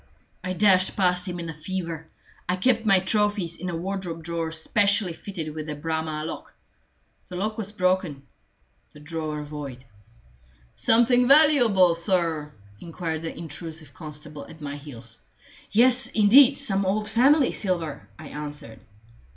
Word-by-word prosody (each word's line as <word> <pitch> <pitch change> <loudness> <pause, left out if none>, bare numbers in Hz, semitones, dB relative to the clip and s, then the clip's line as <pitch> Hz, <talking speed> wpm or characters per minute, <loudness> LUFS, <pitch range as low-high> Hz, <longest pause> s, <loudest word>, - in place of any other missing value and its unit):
I 185 - -3
dashed 185 -1 +3
past 180 -1 +1
him 175 -1 -4
in 170 - -5
a 165 - -5
fever. 165 0 -5 0.4
I 180 - +2
kept 225 +3 +1
my 195 -2 +5
trophies 205 -3 +1
in 180 +2 -5
a 170 - -3
wardrobe 175 -2 -4
drawer 165 -1 -3
specially 200 +3 +1
fitted 165 -4 -7
with 155 0 -6
a 150 - -4
Bramah 160 0 -3
lock. 165 - -8 0.7
The 180 - -7
lock 210 +4 -2
was 210 -2 -5
broken 185 -8 -1 0.7
the 150 - -14
drawer 155 -1 -5
void. 145 -4 -8 0.9
"Something 245 +2 +3
valuable, 245 - +6
sir?" 165 -4 -1 0.3
inquired 165 -1 -5
the 165 - -6
intrusive 160 -2 -7
constable 150 -1 -8
at 160 - -13
my 145 -1 -6
heels. 125 - -9 0.5
"Yes, 245 +3 +4
indeed 250 +6 +6
some 200 -8 +2
old 210 +3 -1
family 260 +6 +4
silver," 170 -7 -3
I 155 -2 -10
answered. 145 -6 -8
175 Hz, 145 wpm, -25 LUFS, 155-205 Hz, 0.9 s, valuable